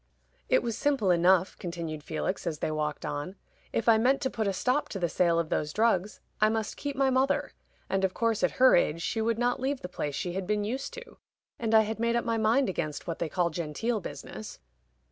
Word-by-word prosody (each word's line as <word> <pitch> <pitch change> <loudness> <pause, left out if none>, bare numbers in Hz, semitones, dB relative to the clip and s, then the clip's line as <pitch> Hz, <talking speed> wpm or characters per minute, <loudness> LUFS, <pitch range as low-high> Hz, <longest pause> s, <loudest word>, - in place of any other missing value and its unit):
"It - - +4
was 230 -2 -2
simple 270 -8 +2
enough," 180 +2 +4
continued 165 -4 -5
Felix, 170 +4 -3
as 160 -2 -2
they 155 - -2
walked 150 -1 -2
on. 145 +7 -4 0.4
"If 230 - -1
I 225 -1 +6
meant 260 +4 +3
to 265 - 0
put 220 -2 -1
a - - +2
stop 255 +9 0
to - - -4
the 175 -2 0
sale 170 0 +2
of 165 -2 0
those 150 0 -1
drugs, 210 -2 +1 0.2
I 215 - +5
must 220 -1 -2
keep 285 -1 -4
my 270 -1 +2
mother, 260 +2 +1 0.4
and 195 0 0
of 190 -1 +1
course 230 -2 +1
at 180 - +2
her 260 0 +7
age 165 -1 +1
she 225 - -1
would 225 0 +1
not 245 +1 +1
leave 270 +1 -1
the - - -5
place 150 -5 -4
she 175 - -3
had 190 0 -3
been 210 0 +1
used 255 +6 -3
to. 485 -1 -11 0.4
And 225 -1 +1
I 220 - +8
had 220 +1 -3
made 235 0 +1
up 235 - 0
my 230 -1 0
mind 225 +5 +3
against 155 -5 -3
what 165 -2 -4
they 165 - -1
call 175 -1 0
genteel 175 +9 -2
business." - - -8
210 Hz, 230 wpm, -29 LUFS, 170-235 Hz, 0.4 s, I